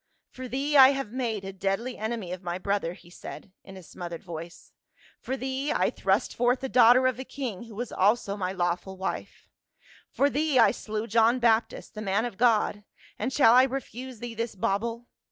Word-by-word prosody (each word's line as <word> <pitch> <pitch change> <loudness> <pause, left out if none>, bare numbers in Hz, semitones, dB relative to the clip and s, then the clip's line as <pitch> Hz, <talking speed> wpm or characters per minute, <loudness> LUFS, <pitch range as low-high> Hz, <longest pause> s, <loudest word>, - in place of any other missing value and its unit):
" - - -53
For 255 0 -6
thee 275 +4 -2
I 270 0 +9
have 270 -6 -4
made 230 -6 -3
a 195 - -6
deadly 195 +6 -2
enemy 220 -4 -4
of 180 0 -5
my 175 -1 -3
brother,"* 195 -3 -1
he 175 -2 -17
said 185 - -10
in 190 0 -12
a 185 - -11
smothered 170 0 -8
voice; 170 0 -9 0.5
"for 265 - -4
thee 265 +2 -2
I - - +1
thrust - - 0
forth 245 +1 +1
the 265 - -3
daughter 250 +1 +6
of 255 -1 +1
a - - -4
king 245 -6 -6
who 225 -3 -12
was 240 +2 -5
also 200 +1 +1
my 185 -2 -2
lawful 180 +1 -2
wife; 190 - -5 0.6
for 280 - +2
thee 290 -1 0
I 225 -4 +6
slew 215 -1 -4
John 230 +2 +3
Baptist, 230 -2 +1
the 215 - -7
man 205 +2 0
of 235 -6 -6
God; 215 -3 +2 0.4
and 260 - -1
shall 260 -5 +5
I 250 - +8
refuse 260 -1 -6
thee 240 -1 -5
this 230 0 -4
bauble 230 +5 -2
225 Hz, 200 wpm, -27 LUFS, 195-255 Hz, 0.6 s, I